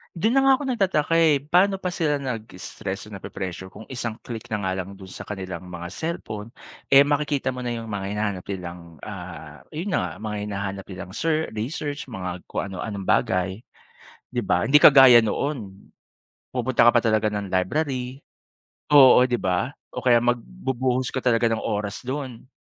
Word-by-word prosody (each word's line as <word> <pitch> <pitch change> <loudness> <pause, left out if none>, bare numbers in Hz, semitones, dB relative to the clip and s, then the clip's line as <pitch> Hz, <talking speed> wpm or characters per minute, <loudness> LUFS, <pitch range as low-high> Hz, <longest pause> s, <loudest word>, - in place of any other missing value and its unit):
Dun 220 +9 +1
na 270 - +5
nga 270 - +6
ako - - -4
nagtataka 190 - +1
eh, 160 -4 +5
pano 180 +7 +2
pa 185 - -3
sila 160 -5 0
nag-stress 105 -5 -6
o 105 - -9
napre-pressure 95 -1 -6
kung 110 - -12
isang 120 -3 -5
click 115 0 -8
na 105 - 0
nga 95 -1 -2
lang 95 - -11
dun 95 -1 -12
sa 95 - -8
kanilang 95 -2 -6
mga 85 0 -6
cellphone, 110 - -5 0.4
eh, 140 +1 +8
makikita 145 -2 0
mo 125 - -5
na 120 - -2
yung 115 -1 -5
mga 100 -2 -4
hinahanap 105 -3 -2
nilang, 85 -4 -8
ah, - - -9
yun 165 +6 -4
na 190 - +1
nga, 90 - -4
mga 105 -1 -4
hinahanap 100 -1 -4
nilang 90 0 -8
ser 160 +1 0
research, 140 +4 -4
mga 90 -4 -5
kung - - -5
ano-anong 95 +1 -5
bagay, 90 0 +2 0.8
di - - 0
ba? - - +1
Hindi 150 +2 +5
kagaya 135 -4 +9
noon, 110 -3 -3 0.8
pupunta 125 -1 +3
ka 120 - +6
pa 120 - +4
talaga 110 -1 +2
ng 105 -2 -2
library. 130 +7 -1 0.7
Oo, 130 -3 +7
di 125 - +1
ba? 90 0 0 0.2
O - - -4
kaya 120 -2 +4
magbubuhos 125 - -1
ka 130 - -1
talaga 115 -2 +2
ng 110 - -1
oras 105 0 -3
dun. 130 -2 -6
115 Hz, 175 wpm, -24 LUFS, 100-140 Hz, 0.8 s, kagaya